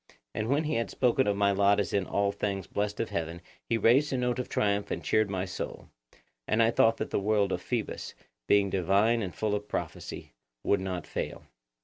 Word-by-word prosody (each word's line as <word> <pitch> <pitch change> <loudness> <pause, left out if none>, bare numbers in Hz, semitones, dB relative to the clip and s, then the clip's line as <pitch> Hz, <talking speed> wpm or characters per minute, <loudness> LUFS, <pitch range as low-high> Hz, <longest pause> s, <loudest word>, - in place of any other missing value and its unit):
And 110 - -2
when 145 +3 +2
he 155 - -1
had 115 - -1
spoken 125 0 +2
of 100 -1 +1
my 100 0 +3
lot 100 +1 +3
as 100 - -1
in 100 -2 +1
all 100 0 +1
things 100 -2 -3
blessed 105 0 -2
of 115 - -2
heaven 85 +1 -3 0.3
he 115 - +2
raised 130 +7 +4
a 130 - 0
note 125 0 0
of 125 - -4
triumph 100 -1 0
and 85 - -3
cheered 110 -1 +2
my 95 -1 -2
soul. 95 - -6 0.6
And 110 +2 +3
I 115 - +4
thought 115 0 +4
that - - -4
the - - +1
word 100 -1 +2
of - - -2
Phoebus, - - -3 0.3
being 100 -1 +4
divine 100 +6 +2
and 95 -4 -4
full 110 -1 -1
of 105 0 -2
prophecy, - - -5 0.3
would 100 - +2
not 90 -4 -4
fail. - - -4
100 Hz, 215 wpm, -29 LUFS, 100-115 Hz, 0.6 s, raised